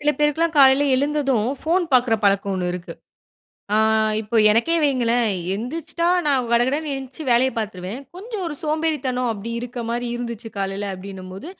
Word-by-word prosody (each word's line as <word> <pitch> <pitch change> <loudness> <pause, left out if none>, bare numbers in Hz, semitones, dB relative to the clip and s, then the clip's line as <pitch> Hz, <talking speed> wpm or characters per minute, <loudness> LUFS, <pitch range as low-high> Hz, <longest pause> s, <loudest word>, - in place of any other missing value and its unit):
சில 295 0 +2
பேருக்குலாம் 315 +2 +1
காலையில 270 +1 +6
எழுந்ததும் 275 -5 +1 0.2
போன் 350 +3 +2
பாக்குற 245 -2 +4
பழக்கம் 200 0 +2
ஒண்ணு 180 -1 -2
இருக்கு. 180 0 -6 0.8
ஆ, - - +4 0.4
இப்போ 220 +2 -5 0.2
எனக்கே 235 +10 +2
வைங்களேன் 240 -4 +2 0.3
எந்திரிச்சிட்டா 320 +8 -3 0.2
நான் 260 -4 +1
கடகடன்னு 275 +6 +1
எந்ச்சி 265 +3 -9
வேலைய 250 +2 +4
பாத்துருவேன், 205 +1 -4 0.2
கொஞ்சம் 415 0 -6
ஒரு 300 - -4
சோம்பேறித்தனம் 300 -6 -1
அப்டி 220 +2 -6
இருக்க 245 0 -6
மாரி 240 +1 -2
இருந்துச்சு 235 -1 -6
காலைல 195 +1 -2
அப்டினம்போது, 190 - -9
245 Hz, 145 wpm, -22 LUFS, 215-295 Hz, 0.8 s, காலையில